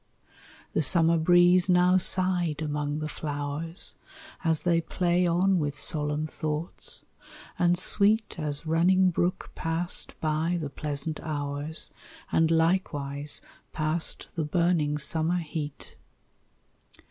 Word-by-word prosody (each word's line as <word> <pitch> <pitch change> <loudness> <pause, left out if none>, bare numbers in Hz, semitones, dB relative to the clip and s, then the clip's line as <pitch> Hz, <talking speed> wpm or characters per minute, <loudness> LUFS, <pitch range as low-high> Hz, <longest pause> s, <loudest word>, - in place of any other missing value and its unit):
The - - +2
summer 165 +2 +3
breeze 175 +2 +5
now 180 +1 +5
sighed 180 -4 +1
among 150 -1 -2
the 155 - -2
flowers 145 +3 -4 0.5
As 160 -2 +1
they 170 -1 +2
play 175 +1 +1
on 180 +2 +2
with 145 -2 -2
solemn 150 0 +1
thoughts; 155 +1 -4 0.5
and 175 0 +3
sweet 210 +2 +3
As 150 0 -2
running 180 +4 +3
brook 175 +2 -2
passed 165 +2 -2
by 160 +3 0
the 150 -4 -5
pleasant 150 +2 -2
hours, 145 0 -3 0.4
And 160 0 +3
likewise 150 -4 0 0.3
passed 155 +1 -1
the 165 - -2
burning 155 -2 +1
summer 160 +4 0
heat. 150 -3 -6
160 Hz, 110 wpm, -27 LUFS, 150-175 Hz, 0.5 s, breeze